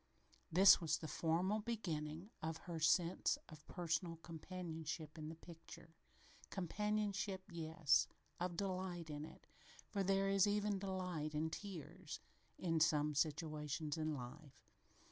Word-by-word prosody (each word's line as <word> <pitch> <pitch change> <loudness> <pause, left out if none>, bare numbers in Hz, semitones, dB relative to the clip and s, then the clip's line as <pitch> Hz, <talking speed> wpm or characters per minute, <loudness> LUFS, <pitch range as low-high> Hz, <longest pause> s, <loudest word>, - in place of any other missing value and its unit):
This 190 +4 +9
was 160 -1 +2
the 160 - -6
formal 175 +7 +1
beginning 175 -5 -3
of 160 0 -2
her 170 -2 -3
sense 170 +2 +3
of 155 -2 -12
personal 170 -1 -1
companionship 160 -2 -5
in 155 -1 -5
the 165 - -6
picture 165 0 -12 0.6
companionship, 200 +1 -1
yes, 160 -2 +3 0.3
of 175 -1 -2
delight 185 -4 -2
in 150 +1 -4
it, - - -13 0.4
for 200 - -1
there 195 +1 +3
is 195 0 +5
even 205 -1 +1
delight 180 -6 -2
in 160 +1 0
tears 185 -6 -6 0.4
in 165 -3 +1
some 150 -1 +4
situations 150 0 0
in 155 -1 -1
life. 135 +2 -9
165 Hz, 125 wpm, -40 LUFS, 155-190 Hz, 0.6 s, This